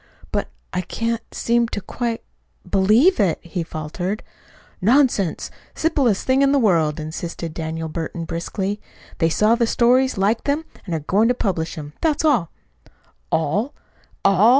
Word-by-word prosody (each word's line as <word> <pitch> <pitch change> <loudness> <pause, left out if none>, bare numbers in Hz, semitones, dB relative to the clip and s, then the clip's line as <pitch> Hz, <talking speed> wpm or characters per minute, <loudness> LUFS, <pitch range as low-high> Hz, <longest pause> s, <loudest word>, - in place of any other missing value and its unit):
"But - - -1 0.3
I 180 - 0
can't 230 +5 -2
seem 235 0 +1
to 215 - -4
quite 230 +3 -3 0.4
believe 220 - +4
it," 190 -6 +3
he 175 +1 -4
faltered. 165 +6 -4 0.6
"Nonsense! 230 - +2 0.2
Simplest 275 - +1
thing 260 +1 +3
in 275 0 +4
the 285 - +4
world," 165 - +2
insisted 165 +1 -5
Daniel 160 0 -4
Burton 165 +1 -4
brusquely. 190 +5 -3 0.4
"They 165 -2 +3
saw 215 +7 +3
the 235 -1 +2
stories, 250 +2 +3
liked 205 +4 +1
them, 295 +3 0 0.2
and 170 - -1
are 160 - -2
going 200 +9 +3
to 245 - +2
publish 170 -8 -1
them. 150 -1 -8
That's 315 -1 +1
all." 240 - +3 0.8
"All! 205 - 0 0.5
ALL!" 195 +3 +6
200 Hz, 150 wpm, -22 LUFS, 165-240 Hz, 0.8 s, ALL